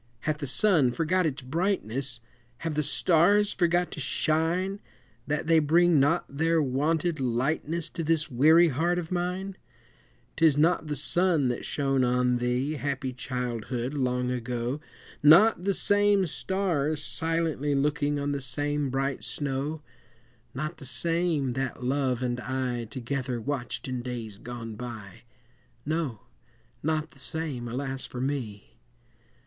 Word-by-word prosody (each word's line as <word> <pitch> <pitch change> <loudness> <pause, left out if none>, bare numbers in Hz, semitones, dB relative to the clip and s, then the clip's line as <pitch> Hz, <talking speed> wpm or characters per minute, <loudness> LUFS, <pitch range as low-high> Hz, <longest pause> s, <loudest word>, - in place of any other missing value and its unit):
Hath 155 -1 -1
the 140 - -4
sun 145 -3 +3
forgot 170 +5 +1
its 140 -3 -4
brightness, 135 - -2 0.4
Have 165 - -1
the 150 - +1
stars 190 +7 +3
forgot 175 0 +1
to - - -7
shine, 165 +7 0 0.5
That 150 +1 -1
they 165 0 +5
bring 165 +1 +4
not 145 +6 +2
their 160 +4 +1
wonted 155 +4 0
lightness 145 +6 -1
To 165 - -4
this 160 -1 +1
weary 160 +7 +5
heart 165 +6 0
of 175 -1 -4
mine? 180 +2 -2 0.8
'Tis 160 -3 +4
not 160 +1 +2
the 150 - -2
sun 155 -1 +2
that 120 - -3
shone 135 -2 +1
on 125 0 +2
thee, 125 +5 -1
Happy 135 -2 -3
childhood, 125 0 -3
long 125 -2 0
ago 125 +2 -3 0.4
Not 180 +6 +6
the 200 - +2
same 205 0 +3
stars 160 -4 -1
silently 160 -3 -1
Looking 145 +1 +1
on 145 0 -1
the 140 -1 -2
same 145 +2 -1
bright 135 -3 -2
snow 140 +5 -3 0.7
Not 155 +5 -4
the 140 - -9
same 155 +1 +1
that 130 -1 -3
Love 130 -1 0
and 120 -1 -1
I 125 -1 -2
Together 125 +1 -3
watched 130 +1 -4
in 130 -1 -3
days 115 -5 -6
gone 115 -2 -7
by! 110 -5 -8 0.6
No, 155 -8 -2 0.6
not 155 +1 -1
the 135 - -14
same, 140 -4 -4
alas 135 +2 -4
for 125 - -7
me! 120 -5 -4
145 Hz, 140 wpm, -27 LUFS, 125-165 Hz, 0.8 s, Not